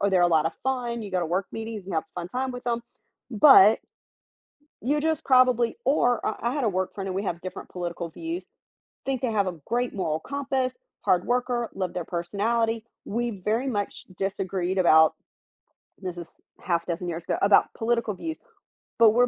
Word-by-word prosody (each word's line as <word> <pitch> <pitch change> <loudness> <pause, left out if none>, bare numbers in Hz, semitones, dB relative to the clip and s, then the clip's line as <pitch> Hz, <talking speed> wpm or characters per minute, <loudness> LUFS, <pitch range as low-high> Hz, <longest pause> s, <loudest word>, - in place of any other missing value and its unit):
or 200 - +2
they're 185 -2 +4
a - - +6
lot 160 -2 +3
of 165 - -1
fun. 245 -3 -1
You 205 - -7
go 185 -1 0
to 170 - -1
work 185 +4 -1
meetings 220 -3 -5
and 190 - -4
have 160 - 0
a - - -1
fun 170 - -6
time 260 +4 -2
with 245 - -8
them, 235 -1 -1 0.5
but 220 -3 +8 1.0
you 290 +5 +1
just 320 -1 0
probably, 255 -3 +4
or 245 -3 +2
I 235 - -1
I - - -2
had 290 - -1
a 225 - +3
work 185 -1 -2
friend 195 -1 -4
and 185 - -3
we 200 - -2
have 170 -2 -3
different 185 - -7
political 175 -1 -4
views, 335 - -5 0.6
think 270 -2 -1
they 245 -3 0
have 200 -3 +2
a 180 - -5
great 245 +1 0
moral 160 -6 -1
compass, 265 - -2 0.3
hard 180 -1 +3
worker, 245 -1 0
love 185 -2 -2
their 175 - -3
personality. 220 +7 -1 0.2
We 230 -3 -3
very 225 +5 +1
much 205 -6 -3
disagreed 190 -1 -2
about 160 -3 +6 0.9
this 180 -2 -5
is 170 - -8 0.3
half 170 -2 0
a 175 - -2
dozen 175 +1 -4
years 170 0 -5
ago - - -1
about 200 0 +5
political 230 -2 0
views, 320 - -5 0.6
but 225 -2 +7
we're 245 +2 +4
215 Hz, 200 wpm, -26 LUFS, 180-245 Hz, 1.0 s, but